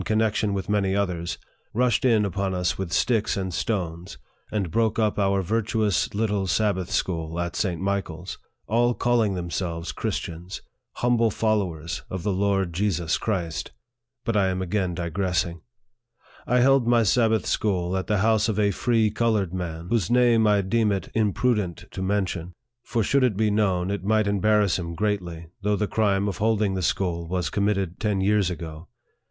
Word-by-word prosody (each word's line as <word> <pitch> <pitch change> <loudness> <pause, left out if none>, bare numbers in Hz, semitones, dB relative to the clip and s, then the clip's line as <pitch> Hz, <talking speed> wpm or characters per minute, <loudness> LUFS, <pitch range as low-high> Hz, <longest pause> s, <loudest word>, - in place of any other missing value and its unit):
connection 110 0 +1
with 100 -1 -3
many 100 -2 +1
others, 90 -4 -1 0.4
rushed 125 -1 +2
in 115 -5 +4
upon 95 0 -2
us 90 -1 0
with 95 -3 -5
sticks 105 - +1
and 95 -2 -3
stones, 90 -4 -3 0.3
and 100 -6 -2
broke 115 +2 +1
up 110 -2 +1
our 100 -1 +2
virtuous 110 0 0
little 105 -3 0
Sabbath 95 -3 0
school, 85 -4 -2
at 85 0 -3
St. 90 -5 -1
Michael's 95 -3 -3 0.3
all 120 +2 +2
calling 115 -5 +1
themselves 85 -1 -3
Christians! 85 +2 -5 0.3
humble 120 -2 +2
followers 95 -7 -1
of 95 -2 -5
the 105 - 0
Lord 95 -2 0
Jesus 85 -3 0
Christ! 90 -7 -3 0.5
But 115 - 0
I 100 -2 +3
am 95 0 -1
again 95 -1 -1
digressing. 85 0 -1 0.9
I 125 0 +3
held 135 -1 +4
my 120 -1 +4
Sabbath 110 +1 +2
school 90 -3 0
at 95 - -2
the 105 - +1
house 110 0 +3
of 105 - -1
a 100 -1 +3
free 110 +1 +1
colored 105 -7 0
man, 85 -2 -5
whose 110 -8 +1
name 120 -2 +4
I 105 -1 +4
deem 110 +2 +1
it 100 -1 -3
imprudent 105 -4 0
to - - -6
men 100 +1 +1
tion; 90 -1 -6 0.3
for 115 -2 -1
should 140 +6 +2
it 115 -6 +2
be 110 -1 +2
known, 95 -3 +1
it 100 -2 -3
might 110 +1 +2
embarrass 100 -1 +2
him 85 -1 -5
greatly, 90 -5 -2
though 105 +1 +1
the 105 - 0
crime 100 -2 +1
of 95 -3 -3
holding 105 -2 +1
the 95 - -2
school 85 -1 -1
was 90 -2 -2
committed 100 -3 0
ten 105 -3 0
years 100 -1 +2
ago. 80 -2 -7
100 Hz, 170 wpm, -25 LUFS, 90-110 Hz, 0.9 s, in